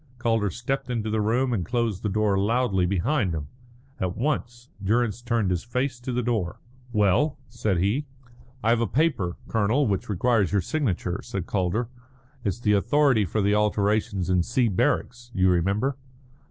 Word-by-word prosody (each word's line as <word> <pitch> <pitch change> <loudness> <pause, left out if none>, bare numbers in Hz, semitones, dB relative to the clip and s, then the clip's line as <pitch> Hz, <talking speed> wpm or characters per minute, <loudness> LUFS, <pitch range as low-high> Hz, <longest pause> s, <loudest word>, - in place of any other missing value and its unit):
Calder 115 -3 +1
stepped 135 +7 -3
into 110 -3 -2
the 110 0 +1
room 120 +4 +1
and 100 -6 0
closed 115 0 -1
the 105 - -1
door 105 0 +1
loudly 100 -2 +1
behind 100 - 0
him. 75 -3 -5 0.5
At 90 -1 -2
once 120 -3 -2 0.2
Durrance 110 +2 +1
turned 115 -5 0
his 90 -2 -1
face 125 +2 -2
to 125 +1 -5
the 125 0 -1
door. 110 -7 -1 0.3
"Well?" 110 - +2
said 110 -6 -1
he. 105 - 0 0.6
"I 115 - +3
have 120 0 +3
a 115 - +1
paper, 130 - 0
Colonel, 115 +6 +2
which 100 -3 -1
requires 105 -2 +2
your 100 - +3
signature," 95 - -1
said 95 -3 -4
Calder. 100 +4 0 0.6
"It's 100 0 -1
the 105 -3 +3
authority 130 +1 +3
for 105 +4 -1
the 100 +1 +3
alterations 105 -2 +1
in 90 -1 +3
C 120 +5 +1
barracks. 120 +5 0
You 95 0 +4
remember?" 100 +10 +1
110 Hz, 165 wpm, -25 LUFS, 95-120 Hz, 0.6 s, You